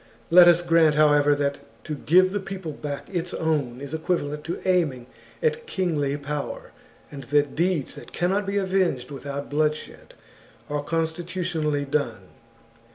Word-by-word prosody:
Let 175 Hz, 0 st, +9 dB
us 175 Hz, 0 st, +5 dB
grant, 165 Hz, -3 st, +4 dB
however, 145 Hz, -1 st, +4 dB
that 140 Hz, 0 st, -1 dB, 0.2 s
to 155 Hz, -, -5 dB
give 185 Hz, +6 st, +4 dB
the 205 Hz, -, -1 dB
people 190 Hz, -4 st, -6 dB
back 145 Hz, -1 st, -6 dB
its 175 Hz, -2 st, -3 dB
own 145 Hz, -7 st, -1 dB
is 140 Hz, +1 st, -8 dB
equivalent 155 Hz, -3 st, -2 dB
to 170 Hz, -, -4 dB
aiming 155 Hz, -10 st, +1 dB, 0.4 s
at 470 Hz, 0 st, 0 dB
kingly 150 Hz, -7 st, -1 dB
power, 145 Hz, 0 st, -5 dB, 0.4 s
and 140 Hz, -2 st, -8 dB
that 145 Hz, 0 st, +1 dB
deeds 170 Hz, -4 st, 0 dB
that -, -, -12 dB
cannot 195 Hz, +3 st, 0 dB
be 200 Hz, +1 st, -1 dB
avenged 185 Hz, -10 st, 0 dB
without 140 Hz, +1 st, -6 dB
bloodshed 150 Hz, +1 st, -2 dB, 0.6 s
are 145 Hz, 0 st, -1 dB
constitutionally 165 Hz, -1 st, -2 dB
done. 120 Hz, -10 st, -2 dB
155 Hz, 145 wpm, -24 LUFS, 145-175 Hz, 0.6 s, Let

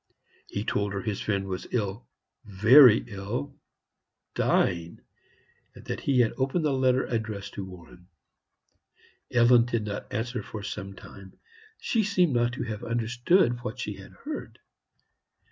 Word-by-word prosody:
He 100 Hz, -, -4 dB
told 100 Hz, -2 st, -1 dB
her 100 Hz, -, -3 dB
his 105 Hz, -3 st, -3 dB
friend 100 Hz, -2 st, -1 dB
was 95 Hz, -1 st, -5 dB
ill 110 Hz, 0 st, -3 dB, 0.4 s
very 110 Hz, +4 st, +7 dB
ill 110 Hz, +7 st, -5 dB, 0.8 s
dying 85 Hz, -1 st, 0 dB, 0.7 s
and -, -, -14 dB
that -, -, -4 dB
he 130 Hz, -3 st, +2 dB
had 115 Hz, -, +1 dB
opened 135 Hz, +5 st, 0 dB
the 145 Hz, -, +2 dB
letter 130 Hz, -1 st, +2 dB
addressed 110 Hz, -4 st, -4 dB
to 100 Hz, -, -5 dB
Warren. 90 Hz, -1 st, -13 dB, 1.2 s
Ellen 120 Hz, -1 st, +5 dB
did 115 Hz, -3 st, -2 dB
not 105 Hz, 0 st, -6 dB
answer 120 Hz, +3 st, -3 dB
for 105 Hz, -2 st, -8 dB
some 100 Hz, -1 st, -6 dB
time; 95 Hz, -1 st, -13 dB, 0.4 s
she 225 Hz, -2 st, 0 dB
seemed 185 Hz, -7 st, +2 dB
not 120 Hz, 0 st, +1 dB
to -, -, -4 dB
have 110 Hz, -3 st, -5 dB
understood 120 Hz, -, +1 dB
what 125 Hz, 0 st, -5 dB
she 105 Hz, -4 st, -4 dB
had 95 Hz, -, -13 dB
heard. 300 Hz, +1 st, -7 dB
115 Hz, 145 wpm, -27 LUFS, 100-125 Hz, 1.2 s, very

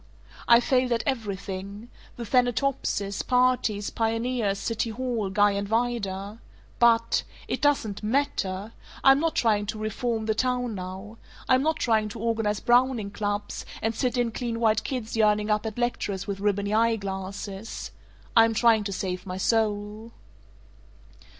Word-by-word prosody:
I've 235 Hz, 0 st, +7 dB
failed 255 Hz, -1 st, +2 dB
at 230 Hz, -, -1 dB
everything: 200 Hz, -3 st, -4 dB, 0.3 s
the 240 Hz, -, -6 dB
Thanatopsis, 245 Hz, -4 st, 0 dB
parties, 250 Hz, -5 st, +1 dB
pioneers, 225 Hz, -2 st, 0 dB
city 230 Hz, +2 st, -2 dB
hall, 235 Hz, -3 st, -2 dB
Guy 205 Hz, +1 st, +4 dB
and 200 Hz, 0 st, -2 dB
Vida. 215 Hz, -3 st, -2 dB, 0.4 s
But 230 Hz, -1 st, +4 dB, 0.3 s
It -, -, -3 dB
doesn't 270 Hz, -9 st, +1 dB
MATTER! 215 Hz, -4 st, -1 dB, 0.3 s
I'm 270 Hz, +1 st, +7 dB
not 330 Hz, +1 st, 0 dB
trying 210 Hz, -3 st, +2 dB
to 215 Hz, -, -3 dB
'reform 220 Hz, +1 st, -2 dB
the 220 Hz, -, +1 dB
town' 250 Hz, 0 st, 0 dB
now. 190 Hz, +3 st, -7 dB, 0.3 s
I'm 255 Hz, 0 st, +4 dB
not 315 Hz, +2 st, +1 dB
trying 220 Hz, -6 st, +1 dB
to -, -, -8 dB
organize 220 Hz, -2 st, 0 dB
Browning 240 Hz, -4 st, +2 dB
Clubs, 205 Hz, 0 st, -3 dB, 0.2 s
and 225 Hz, +1 st, -1 dB
sit 250 Hz, +1 st, -1 dB
in 240 Hz, -1 st, +1 dB
clean 230 Hz, 0 st, -3 dB
white 220 Hz, -2 st, +2 dB
kids 245 Hz, -5 st, -4 dB
yearning 210 Hz, -1 st, +2 dB
up 210 Hz, +1 st, +1 dB
at 220 Hz, -, -6 dB
lecturers 225 Hz, -5 st, -2 dB
with 200 Hz, -2 st, -4 dB
ribbony 200 Hz, 0 st, 0 dB
eyeglasses. 200 Hz, -2 st, -2 dB, 0.4 s
I 225 Hz, -1 st, +8 dB
am 225 Hz, -1 st, -1 dB
trying 225 Hz, -2 st, +4 dB
to 200 Hz, -, -3 dB
save 185 Hz, -1 st, -4 dB
my 185 Hz, 0 st, -4 dB
soul. 215 Hz, +1 st, -1 dB
220 Hz, 145 wpm, -26 LUFS, 205-240 Hz, 0.4 s, I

